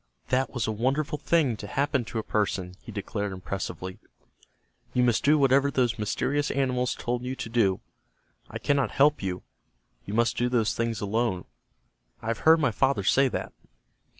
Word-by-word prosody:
"That 130 +1 +1
was 120 -4 -2
a 110 - -1
wonderful 135 +7 -1
thing 150 -6 +2
to 100 - -7
happen 140 +2 0
to 115 - -6
a 110 - -1
person," 95 -4 -1
he - - -10
declared, 100 0 -3
impressively. 95 0 -5 1.0
"You 125 - +4
must 120 -2 +2
do 150 +2 +5
whatever 140 0 +4
those 125 -5 0
mysterious 145 +8 0
animals 125 -2 0
told 120 0 -2
you 130 +1 -4
to 115 - -6
do. 105 -5 +2 0.7
I - - -5
cannot 140 -1 +1
help 145 +1 +3
you. 95 -2 -3 0.6
You 100 - -4
must 115 +1 +2
do 120 0 +1
those 115 -4 +1
things 115 -1 -2
alone. 105 -2 -1 0.7
I 115 - -5
have 115 - -1
heard 160 0 +7
my 140 -5 +2
father 130 -2 +1
say 135 +7 +4
that." - - -4
120 Hz, 175 wpm, -27 LUFS, 105-135 Hz, 1.0 s, heard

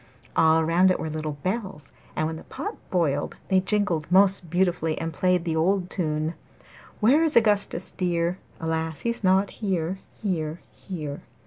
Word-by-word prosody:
All 160 0 +5
round 175 +3 +4
it 185 - +1
were 160 - -3
little 155 -1 -3
bells, 185 - -3 0.2
and 155 - 0
when 160 +1 -2
the - - -10
pot - - -5
boiled 150 -6 0
they 190 - +5
jingled 185 -5 0
most 190 -2 +4
beautifully 175 -2 +1
and 165 0 -3
played 180 +2 +1
the 165 -2 -1
old 180 +3 +1
tune 155 -2 -1 0.7
'Where 270 +9 +5
is 315 -2 +1
Augustus 210 -3 +2
dear? 175 -1 -1 0.2
Alas! 160 -1 -2
he's 235 -2 -2
not 190 +1 +3
here, 190 -3 -2
here, 165 -6 -3
here! 155 -7 -6
175 Hz, 155 wpm, -25 LUFS, 160-190 Hz, 0.7 s, All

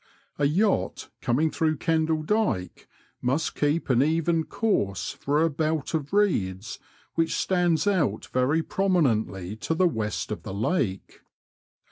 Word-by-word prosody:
A 145 - +3
yacht 190 +8 0
coming 150 +6 +1
through 155 -1 0
Kendall 160 -1 +1
Dyke 190 - -1 0.3
must 135 +6 0
keep 150 +3 0
an 125 -2 +3
e?en 160 +2 +1
course 100 - -1
for 145 +3 0
a - - +4
belt 155 0 -1
of 150 -3 -2
reeds 110 - 0 0.3
which 165 0 0
stands 175 -2 +1
out 190 -8 +1
very 140 +6 +2
prominently 115 - 0
to 160 - -2
the 185 +2 +4
west 105 - -3
of - - -4
the 95 - -6
lake. 110 - -2
155 Hz, 135 wpm, -26 LUFS, 120-165 Hz, 0.3 s, a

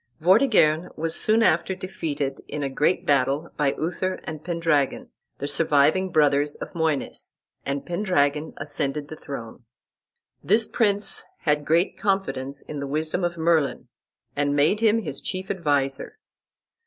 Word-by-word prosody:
Vortigern 180 - +4
was 160 +1 -1
soon 220 +1 +3
after 190 -4 +2
defeated 150 -7 -4
in 150 - -4
a 135 - -2
great 150 +6 +1
battle 140 +3 +1
by 145 -2 +1
Uther 180 +3 -2
and 155 -1 -7
Pendragon, 165 -5 0 0.3
the 140 - -4
surviving 155 +5 +2
brothers 145 -1 +3
of - - -8
Moines, 160 -4 -2 0.3
and 140 0 -2
Pendragon 160 -5 0
ascended 145 0 -3
the 155 - -7
throne. 120 -5 -8 0.8
This 215 +3 +3
prince 205 -3 +1 0.2
had 150 -1 +1
great 170 +4 +1
confidence 140 -9 -1
in 150 - -7
the 140 - -4
wisdom 155 +5 -1
of 170 -1 -1
Merlin, 160 -3 +1 0.5
and 145 0 +1
made 150 +9 +3
him 225 0 +3
his 145 -5 -5
chief 185 0 -4
adviser. 145 - -1
155 Hz, 140 wpm, -24 LUFS, 145-185 Hz, 0.8 s, Vortigern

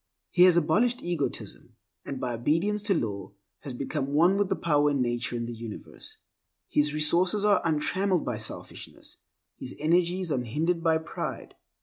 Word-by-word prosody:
He 180 0 +6
has 180 -2 +6
abolished 220 +10 +2
egotism, 170 -5 -4 0.3
and, 135 - -5
by 125 -1 -2
obedience 165 - 0
to 205 -2 +1
law, 100 - -3 0.3
has 135 -3 -7
become 140 +1 -3
one 175 +5 +5
with 200 -1 +1
the 190 - +1
power 150 -4 +2
in 140 -1 0
nature 120 -1 -1
and 115 0 -3
the 120 - -5
universe. 115 -2 -9 0.5
His 150 0 +2
resources 175 +7 +2
are 205 -1 +4
untrammeled 175 +3 +1
by 120 - -2
selfishness; 110 - -8 0.4
his 130 - -6
energies 175 +2 +1
unhindered 150 +7 0
by 165 -1 +3
pride. 160 - -6
155 Hz, 155 wpm, -27 LUFS, 125-180 Hz, 0.5 s, He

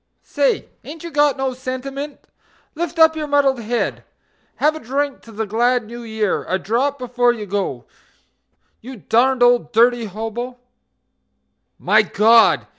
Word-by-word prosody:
Say! - - 0 0.2
ain't 315 +3 -10
you 340 - -7
got 290 -2 +2
no 265 -1 -2
sentiment? 270 +3 -6 0.5
Lift 340 +1 -4
up 320 0 +5
your 305 -1 -4
muddled 280 -3 +2
head; 235 +1 -2 0.5
Have 305 +1 +1
a - - -6
drink 280 +2 -3
to 230 - -15
the 220 +1 -3
glad 240 +3 +1
New 235 +2 -9
Year, 220 -3 -2
a 185 - +1
drop 245 +9 -1
before 245 -1 +1
you 220 -3 -7
go 185 - -3 1.0
You 260 +3 -9
darned 245 +4 +2
old 245 0 +3
dirty 240 +1 +3
hobo... 225 +5 -6 1.2
My 210 +4 +4
God! 220 +2 +4
245 Hz, 145 wpm, -19 LUFS, 225-280 Hz, 1.2 s, up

